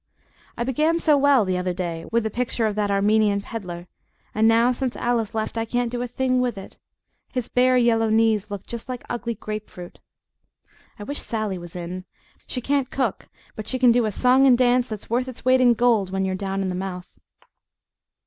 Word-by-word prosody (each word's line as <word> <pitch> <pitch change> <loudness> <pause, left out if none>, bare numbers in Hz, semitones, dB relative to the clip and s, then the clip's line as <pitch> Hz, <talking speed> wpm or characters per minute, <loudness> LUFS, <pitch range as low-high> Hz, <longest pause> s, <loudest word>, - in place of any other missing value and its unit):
I - - -1
began 305 +7 +1
so 310 -3 +4
well 280 -5 +4
the 185 -1 -1
other 180 0 -2
day 170 -3 -4
with 230 0 +2
the 220 - -2
picture 235 0 -1
of 215 - 0
that 205 0 -1
Armenian 205 +1 +2
peddler, 180 -5 -7 0.5
and 220 +1 +3
now 230 +2 +4
since 250 0 -3
Alice 230 -3 -1
left 220 +1 -2
I 225 - -1
can't 240 +1 -1
do 245 0 -3
a 245 - -2
thing 255 +1 0
with 245 -4 -1
it; 195 - -11 0.5
his 250 -2 -3
bare 255 0 +3
yellow 225 -2 +3
knees 220 -2 +2
look 205 -2 -6
just 235 +1 -7
like 250 -1 -5
ugly 235 -1 -3
grape 215 +1 -6
fruit. 175 -1 -11 1.0
I 205 - -8
wish 285 +7 -2
Sally 215 -5 -3
was 175 0 -11
in. 180 +1 -6 0.4
She 250 - -4
can't 275 0 0
cook, 255 -7 -2 0.3
but 215 0 -7
she 260 - -1
can 250 -1 +5
do 240 0 +3
a 215 - -1
song 255 +5 +4
and 250 -2 +6
dance 250 0 +3
that's 215 -3 -7
worth 250 +2 +1
its 255 -1 -9
weight 255 0 +4
in 245 -2 +5
gold 225 -5 +2
when 190 0 -1
you're 190 - -1
down 195 +1 -2
in 190 - -2
the - - -2
mouth. 180 -1 -5
225 Hz, 210 wpm, -23 LUFS, 200-250 Hz, 1.0 s, and